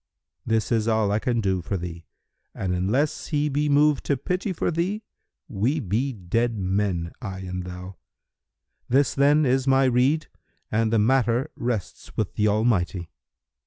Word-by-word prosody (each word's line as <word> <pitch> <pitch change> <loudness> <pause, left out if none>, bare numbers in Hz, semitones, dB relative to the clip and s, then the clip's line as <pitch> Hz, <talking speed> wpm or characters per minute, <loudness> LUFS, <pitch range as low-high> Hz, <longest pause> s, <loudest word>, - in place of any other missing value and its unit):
This 115 -1 +1
is 115 -1 +2
all 110 -2 +2
I 105 - +2
can 120 0 0
do 95 -3 0
for 95 +3 -3
thee; 85 -1 -7 0.5
and 95 -2 -2
unless 110 +12 0
he 150 -1 0
be 145 +1 0
moved 145 0 +4
to 140 - +1
pity 180 - -2
for 175 - -1
thee, 185 +7 -1 0.4
we 120 +10 0
be 120 +4 -1
dead 115 +3 -1
men, 95 -3 -1
I 95 -2 -5
and 90 -1 -4
thou. 90 0 -8 0.9
This 135 +1 +3
then 145 +2 +4
is 130 +1 +1
my 135 0 +5
rede 130 +5 +2 0.5
and 110 0 +1
the 115 - +3
matter 125 +4 +2
rests 120 -5 -4
with 105 - -1
the 105 - +1
Almighty." 100 -5 +1
115 Hz, 160 wpm, -25 LUFS, 95-135 Hz, 0.9 s, my